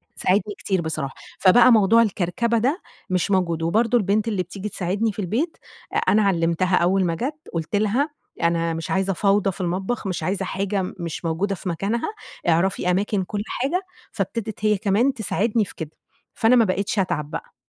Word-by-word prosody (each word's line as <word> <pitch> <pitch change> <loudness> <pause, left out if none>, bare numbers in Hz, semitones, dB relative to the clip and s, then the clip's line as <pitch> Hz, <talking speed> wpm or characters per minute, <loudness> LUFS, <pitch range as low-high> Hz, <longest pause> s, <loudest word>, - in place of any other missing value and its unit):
ساعدني 205 +2 +1
كتير 190 -3 -1
بصراحة، 155 -4 -3 0.3
فبقى 235 +6 +7
موضوع 225 0 +6
الكركبة 225 +2 0
ده 270 - 0 0.3
مش 185 +1 0
موجود، 170 -4 +1
وبرضه 225 +8 +3
البنت 210 +1 +1
اللي 200 -5 0
بتيجي 195 +4 -6
تساعدني 200 +4 -1
في 205 - -10
البيت، 235 - -1 0.4
أ - - +1
أنا 215 - +3
علّمتها 180 -1 +2
أول 185 +2 +2
ما 165 -1 0
جات، 285 - -3
قُلت 165 +3 -2
لها 215 +8 +1 0.3
أنا 170 0 +1
مش 165 0 -5
عايزة 195 0 +1
فوضى 200 +1 +2
في 190 - -8
المطبخ، 190 +5 -2
مش 185 - -3
عايزة 190 +1 -1
حاجة 195 +2 -1 0.2
مش 170 0 -5
موجودة 185 +5 0
في 185 - -5
مكانها، 200 +8 -1 0.4
اعرفي 180 +2 +2
أماكن 195 +1 0
كُلّ 205 +2 -4
حاجة، 295 +9 -1 0.3
فابتدت 215 -3 -3
هي 210 -1 +4
كمان 215 +7 +2
تساعدني 220 -1 0
في - - -12
كده، 160 -2 -6 0.4
فأنا 230 +1 +4
ما 235 -2 +5
بقيتش 200 +2 -1
أتعب 165 -6 -1
بقى. - - -6
195 Hz, 175 wpm, -23 LUFS, 180-220 Hz, 0.4 s, فبقى